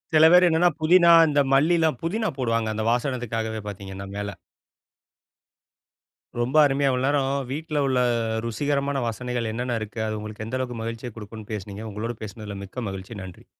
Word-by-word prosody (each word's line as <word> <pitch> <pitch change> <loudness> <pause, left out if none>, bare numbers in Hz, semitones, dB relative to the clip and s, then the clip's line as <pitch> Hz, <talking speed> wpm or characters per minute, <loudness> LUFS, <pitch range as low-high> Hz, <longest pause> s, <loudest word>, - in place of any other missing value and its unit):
சில 155 +1 +8
பேரு 180 0 +7
என்னன்னா, 165 +2 +4
புதினா, 170 +2 +6 0.2
இந்த 145 -1 +3
மல்லிலாம் 160 -1 +3
புதினா 215 +7 0
போடுவாங்க. 115 -3 0
அந்த 110 0 -2
வாசனைக்காகவே 115 -3 -2
பார்த்தீங்கன்னா, 100 -1 -7
மேல. 100 0 -3 2.1
ரொம்ப 125 +5 +1
அருமையா 140 0 +2
இவ்வளவு 130 0 0
நேரோ, 140 0 +2 0.3
வீட்ல 150 +2 -4
உள்ள 130 -1 +2 0.5
ருசிகரமான 140 +4 -1
வாசனைகள் 120 0 -3
என்னென்ன 120 +1 -2
இருக்கு, 110 +1 -6
அது 110 0 -3
உங்களுக்கு 110 0 -7
எந்த 120 +4 -3
அளவுக்கு 125 -2 -3
மகிழ்ச்சிய 115 +2 -5
கொடுக்கும்னு 110 0 -9
பேசுனீங்க. 105 +1 -6
உங்களோடு 115 +4 -4
பேசுனதில 105 -1 -7
மிக்க 115 +3 -6
மகிழ்ச்சி. 95 +2 -7
நன்றி. 90 -2 -11
120 Hz, 150 wpm, -24 LUFS, 110-140 Hz, 2.1 s, சில